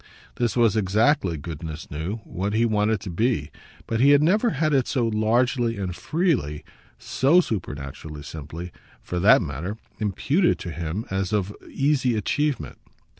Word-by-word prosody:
This 120 0 0
was 115 -3 +4
exactly, 105 - +2
goodness 80 +1 -7
knew, 85 +9 -4
what 100 +3 -3
he 115 +2 +3
wanted 105 -1 +1
to 95 - -6
be; 85 - 0 0.3
but 115 - -2
he 135 +3 +6
had 145 +1 +6
never 210 +9 +3
had 155 -4 0
it 135 -3 +2
so 125 -4 +1
largely 115 +2 +1
and 95 -3 -3
freely 150 - 0 0.3
SO 145 +7 +3
supernaturally 75 - -4
simply, 80 +4 -7 0.3
for 90 - -3
that 100 0 +6
matter 85 +8 -5 0.2
imputed 135 - +1
to 85 - -6
him 85 +6 -4
as 95 +1 -1
of 105 -1 -1
easy 135 -4 +1
achievement. 135 - -1
105 Hz, 150 wpm, -24 LUFS, 85-130 Hz, 0.3 s, he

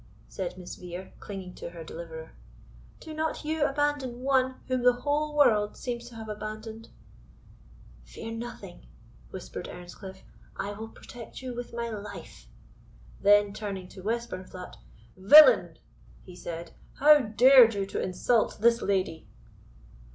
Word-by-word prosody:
said 180 -1 -5
Miss 180 -1 -8
Vere, 180 +1 -8
clinging 190 -3 -8
to - - -8
her 170 -1 -9
deliverer; 160 -1 -8 0.7
"do 315 - -9
not 315 0 -3
you 310 0 0
abandon 280 -3 -1
one 260 -1 +2
whom 255 -1 0
the 250 0 +5
whole 295 +1 0
world 210 -7 +4
seems 240 -2 -5
to 235 - -14
have 220 -1 -8
abandoned." 215 +1 -7 1.2
"Fear - - -8
nothing," 225 - -8 0.4
whispered - - -7
Earnscliff, 190 +2 -10 0.3
"I 200 - -4
will 215 +2 -7
protect 235 +2 -11
you 255 -1 -5
with 245 0 -6
my 235 0 -3
life." 210 -1 -9 0.7
Then 205 0 +5
turning 200 -3 -5
to 190 - -11
Westburnflat, 190 -4 -5 0.4
"Villain!" 300 - +8 0.5
he 180 - -12
said, 170 -1 -7 0.2
"how 300 +1 +7
dared 240 0 +6
you 200 -1 -1
to 195 - -4
insult 215 +5 +1
this 235 +2 +4
lady?" 185 -5 -1
215 Hz, 135 wpm, -28 LUFS, 185-250 Hz, 1.2 s, Villain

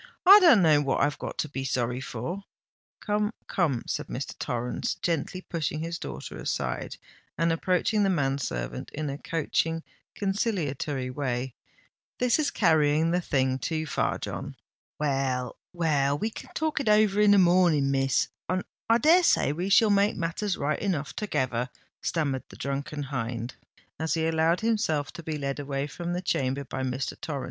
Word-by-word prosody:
"I 395 +3 +11
don't 325 - +7
know 155 -3 +5
what 140 -2 0
I've 145 +1 +1
got - - -5
to - - -1
be 135 -2 -5
sorry 125 -1 -1
for——" 150 - -5 0.6
"Come, 210 0 0
come," 145 -10 0
said - - -3
Mr. - - -5
Torrens, 120 0 -2
gently 170 +2 -2
pushing 155 -4 -3
his 170 +1 -4
daughter - - -7
aside, - - -3 0.4
and 165 +1 +2
approaching 185 +5 +1
the 195 - +3
man 140 -6 +1
servant - - -4
in 150 -2 -2
a 140 - -6
coaxing, 165 +1 -1 0.3
conciliatory 155 - -1
way; 125 -2 -2 0.6
"this 250 +3 +2
is 295 -2 +2
carrying 155 - +3
the 180 +1 +1
thing 130 -4 0
too 155 +4 -2
far, - - 0
John——" - - -6 0.4
"Well—well, 140 +2 0
we 220 +8 -2
can - - -10
talk 315 -1 0
it 270 - 0
over 210 -1 +4
in 210 - +6
the 205 - +7
morning, 175 -6 +4
Miss—and 135 +7 0 0.3
I 230 - +6
dare 325 +8 +5
say 145 - +3
we 180 +5 -3
shall 210 +2 +5
make 200 +1 +3
matters 175 +4 -2
right 150 +2 -1
enough 150 -10 -2
together," 125 - -1 0.3
stammered 140 -6 -1
the - - -12
drunken 140 +2 -3
hind, 120 -3 -4 0.5
as 160 +1 0
he 160 -1 0
allowed 165 +1 +2
himself 210 -11 0
to - - -8
be 155 -1 -4
led 140 0 -3
away 140 -1 -2
from 175 +3 -5
the 180 +1 -3
chamber 135 -4 0
by 130 0 -5
Mr. 130 +1 -3
Torrens. 145 -3 -3
155 Hz, 165 wpm, -27 LUFS, 135-185 Hz, 0.6 s, I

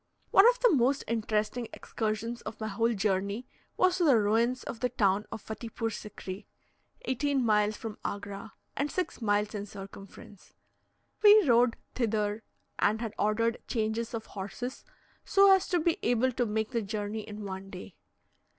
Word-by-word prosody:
One 400 +5 +8
of - - 0
the - - +6
most 270 +1 +2
interesting 220 +1 -1
excursions 225 +2 -3
of 225 - -8
my 220 -1 -3
whole 230 +3 +1
journey 200 +3 -1 0.3
was 370 0 +3
to - - +3
the 280 -7 +6
ruins 225 +4 +1
of 230 - -6
the 250 - 0
town 205 -4 +1
of 220 -2 -7
Fattipoor 225 +1 -4
Sikri, 200 -2 -8 0.6
eighteen 270 0 0
miles 210 -1 +2
from 220 -2 -7
Agra, 200 +1 -5 0.2
and 285 +1 -1
six 365 -6 -3
miles 205 -1 +1
in 205 -1 -4
circumference. 195 0 -12 0.7
We 420 -4 +7
rode 235 -1 +4 0.2
thither, 215 -3 -1 0.4
and 215 +2 +2
had 225 -2 -4
ordered 230 +2 +1
changes 225 0 -2
of 225 - -5
horses, 230 +7 -6 0.4
so 395 0 +6
as 380 - +2
to 355 - +1
be 330 +1 +1
able 245 +2 +2
to 245 0 -1
make 220 +2 -1
the 235 -2 0
journey 210 +1 -3
in 210 0 -8
one 190 0 -6
day. 185 -1 -10
220 Hz, 160 wpm, -29 LUFS, 210-245 Hz, 0.7 s, One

